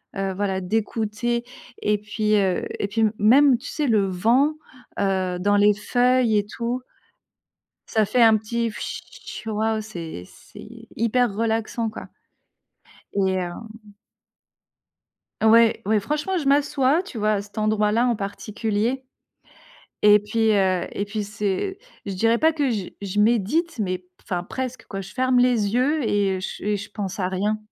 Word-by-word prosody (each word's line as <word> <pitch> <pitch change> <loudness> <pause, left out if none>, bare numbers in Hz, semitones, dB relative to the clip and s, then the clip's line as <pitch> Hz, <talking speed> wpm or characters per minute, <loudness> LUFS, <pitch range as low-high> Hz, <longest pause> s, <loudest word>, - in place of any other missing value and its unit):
heu, 195 -1 -2
voilà 190 -1 -1
d'écouter. 220 +4 -1 0.4
Et 210 0 +2
puis, 210 0 0
heu, 190 -3 +1
et 200 - 0
puis 225 +3 -2
m 215 0 +3
même, 255 +5 +5
tu - - -10
sais, 300 -3 -1
le 210 -4 +3
vent, 235 +11 +2 0.5
heu, 185 -2 0
dans 205 +2 +2
les 205 0 +5
feuilles, 245 +1 +2
et 205 - +1
tout. 235 +4 -3 1.1
Ça 220 -2 +1
fait 235 +3 +2
un 220 -1 +7
petit 230 +2 -2
«fchi», 220 - -8
waouh, 220 +1 0
c'est 170 - -7
c'est 225 - -14
hyper 230 0 +1
relaxant, 225 0 -1
quoi. - - -9 1.1
Et 190 -1 +2
hem 210 +4 -7 1.5
Ouais. 225 +1 +5
Ouais, 210 0 +2
franchement, 300 - -1
je 290 - -4
m'assois, 285 +2 +3
tu 315 - -8
vois, 215 0 +2
à 200 - -1
cet 205 +2 -11
endroit 215 -1 +1
là, 235 +3 +3
en 240 -3 +1
particulier. 215 +4 -2 1.0
Et 210 0 +7
puis, 220 +2 +1
heu, 190 -2 +1
et 200 - -2
puis, 210 0 -3
c'est 210 - -2 0.3
je 200 - -4
dirais 225 +5 +2
pas 320 +3 +3
que 290 -4 0
je 205 -6 -2
je 200 +1 -2
médite, 240 - +1
mais 185 -3 -1
p 180 - -27 0.2
enfin 180 -3 -3
presque, 255 +4 -5
quoi, 195 -1 -5
je 195 - -10
ferme 255 -1 +2
les 230 -4 +2
yeux 280 +4 +2
et 195 -2 +1
je 190 - -6
et 210 0 0
je 200 +1 -8
pense 200 -2 -5
à 180 - +1
rien. 205 +3 -1
215 Hz, 160 wpm, -23 LUFS, 200-240 Hz, 1.5 s, un